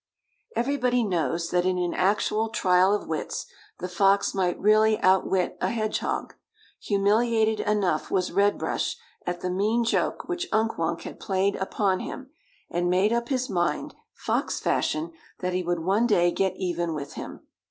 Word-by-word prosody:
Everybody 250 0 +1
knows 170 - -1
that 180 0 +2
in 185 0 +1
an 175 -1 -1
actual 210 +3 +1
trial 185 -2 +3
of 210 - -1
wits 160 -2 -3 0.3
the 180 - -4
fox 195 +2 +2
might 185 -2 0
really 215 +1 +4
outwit 185 0 +2
a - - +1
hedgehog. 215 -2 -2 0.5
Humiliated 220 +2 +2
enough 200 -7 0
was 185 -2 0
Red 205 +1 +3
Brush - - -2 0.3
at 175 0 -3
the 180 - -2
mean 215 +6 +1
joke 230 - 0
which 355 +1 -3
Unk 220 -2 +1
Wunk 165 +1 -1
had - - -8
played 195 +1 0
upon 190 0 0
him, 270 0 -7 0.4
and 175 +1 -1
made 190 +5 +3
up 235 0 -1
his 255 -2 0
mind, 175 -3 -1 0.2
fox - - -1
fashion, 155 +2 0 0.3
that 180 0 -1
he 185 - 0
would 175 -1 -1
one 200 +7 +2
day 175 -6 +3
get 190 0 0
even 175 -3 -2
with 140 -1 -6
him. - - -8
195 Hz, 165 wpm, -26 LUFS, 180-220 Hz, 0.5 s, really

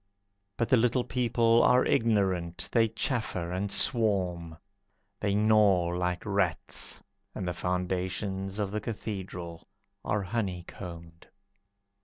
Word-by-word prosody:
But 115 - 0
the 130 - +5
little 125 +2 +2
people 115 -2 +2
are 125 +1 +4
ignorant, 95 -7 +1
They 115 -2 +4
chaffer, 110 -6 -2
and 95 +2 -2
swarm. 90 - +1 0.6
They 100 -1 0
gnaw 105 -5 +3
like 90 0 -2
rats, - - -1 0.3
And 95 - -4
the 90 - -1
foundations 95 +2 -2
of 100 -2 -2
the 105 +1 -2
Cathedral 95 -6 -6 0.4
are 105 -1 -1
honeycombed. 90 -4 -6
95 Hz, 110 wpm, -29 LUFS, 90-110 Hz, 0.6 s, the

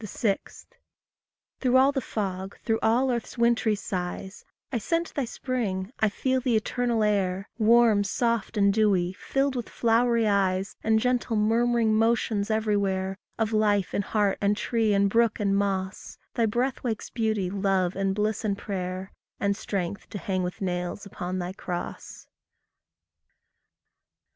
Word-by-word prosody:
6. 205 0 -3 0.9
Through 255 -1 +3
all 265 +2 +5
the 275 -2 -1
fog, 195 -4 -4
through 225 -1 +1
all 250 +4 +3
earth's 235 -1 -4
wintery 235 -2 +3
sighs, 190 -1 -5 0.3
I 240 - 0
scent 335 +9 -1
Thy 280 - -1
spring, 225 -6 -3
I 220 - +3
feel 260 +5 0
the 250 -2 +1
eternal 235 +1 0
air, 195 -2 0
Warm, 225 -2 +5
soft, 230 +1 -1
and 200 -1 +4
dewy, 195 -4 +2
filled 270 +6 -1
with 240 -3 -4
flowery 235 0 +2
eyes, 195 -1 +1
And 220 0 +3
gentle, 245 -1 0
murmuring 225 +1 +2
motions 225 -2 +1
everywhere 200 -3 0 0.2
Of 225 -1 0
life 205 -3 +2
in - - +1
heart, 205 0 0
and 205 0 +2
tree, 225 -2 +1
and 200 0 +4
brook, 230 +2 +2
and 200 -2 +1
moss; 195 -1 -2 0.2
Thy 230 -1 +2
breath 245 +5 -1
wakes 225 -4 -3
beauty, 215 -5 0
love, 190 -2 +1
and 195 0 0
bliss, 210 +1 -1
and 200 -2 0
prayer, 185 -1 -4 0.3
And 200 0 +1
strength 195 -2 -4
to - - -5
hang 185 -1 -2
with 180 +2 -4
nails 180 +1 -3
upon 185 -1 -5
thy 180 0 -3
cross. 175 -2 -6
210 Hz, 150 wpm, -26 LUFS, 195-230 Hz, 0.9 s, all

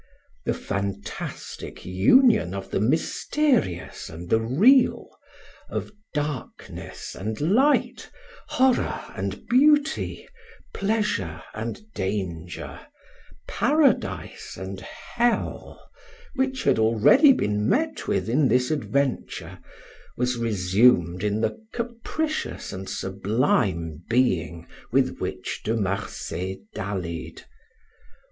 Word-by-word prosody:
The - - 0
fantastic 100 0 -5
union 100 - +4
of 95 -1 -6
the - - +1
mysterious 160 - 0
and 85 +2 -9
the 110 - +5
real, 210 - +4 0.6
of - - -4 0.2
darkness 145 -3 -5
and 110 +3 -4
light, 245 - +2 0.4
horror 260 -1 +2 0.2
and - - -4
beauty, 295 +4 +3 0.5
pleasure 200 - -1
and 115 - -5
danger, 95 -4 -4 0.7
paradise 285 +2 +1
and 95 0 -6
hell, 240 - -2 0.4
which 265 -1 -1
had - - +3
already 115 - +6
been 105 - +1
met 310 +3 0
with - - 0
in 135 +5 +3
this 125 +3 +2
adventure, 140 -3 -2 0.6
was 125 0 +1
resumed 95 -4 +3
in 105 +1 0
the 220 - -2
capricious 245 +7 -3
and 95 0 -6
sublime 95 - 0
being 90 -9 +1 0.3
with - - +2
which - - -4
De 110 - 0
Marsay 95 -2 -3 0.2
dallied. 90 -4 -5
115 Hz, 95 wpm, -25 LUFS, -, 0.7 s, already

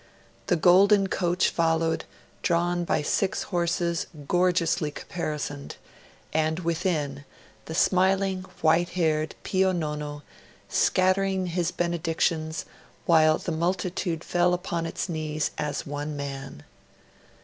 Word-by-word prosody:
The 180 - +3
golden 195 +4 +5
coach 175 -1 +1
followed, 165 -1 +1 0.4
drawn 175 0 +1
by 155 - 0
six 190 +5 0
horses 170 -2 -1 0.2
gorgeously 175 -3 +2
caparisoned, 150 -2 -5 0.6
and 155 0 +1
within, 160 -5 -1 0.4
the 160 - -6
smiling 190 +1 +2 0.2
white 165 +2 +3
haired 155 -2 +1
Pio 190 0 +2
Nono, 150 -3 -3 0.4
scattering 185 0 +2
his 175 -1 -1
benedictions, 165 -2 -1 0.4
while 155 -2 +5
the 175 - -4
multitude 175 0 -1
fell 175 0 +2
upon 170 -2 -3
its 165 - -3
knees 155 -2 -2
as 150 -1 -2
one 145 +1 -4
man. 135 - -6
170 Hz, 105 wpm, -26 LUFS, 155-180 Hz, 0.6 s, golden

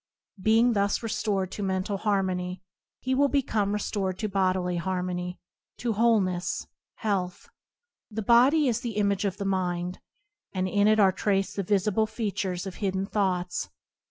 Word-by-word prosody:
Being 225 +4 +4
thus 200 +2 +1
restored 205 -4 -1
to - - -5
mental 190 +1 -1
harmony, 185 -3 -1 0.4
he 260 - -1
will 280 +2 +4
become 225 -8 0
restored 200 -2 -2
to 215 - -2
bodily 185 -2 0
harmony, 180 0 -2 0.4
to 235 -2 -1
wholeness, 200 -5 +1 0.3
health. 190 -5 -2 0.6
The 220 0 -4
body 260 +7 +5
is 240 -1 0
the 235 -4 -4
image 200 -1 +1
of 195 - -1
the 200 - -4
mind, 180 -2 -1 0.5
and 185 -1 0
in 205 +2 +3
it 215 0 +4
are 195 -2 +6
traced 195 0 0
the 200 - 0
visible 205 +2 +1
features 200 -4 -3
of 190 -2 -7
hidden 190 -1 -1
thoughts. 185 -3 -1
200 Hz, 150 wpm, -27 LUFS, 185-215 Hz, 0.6 s, are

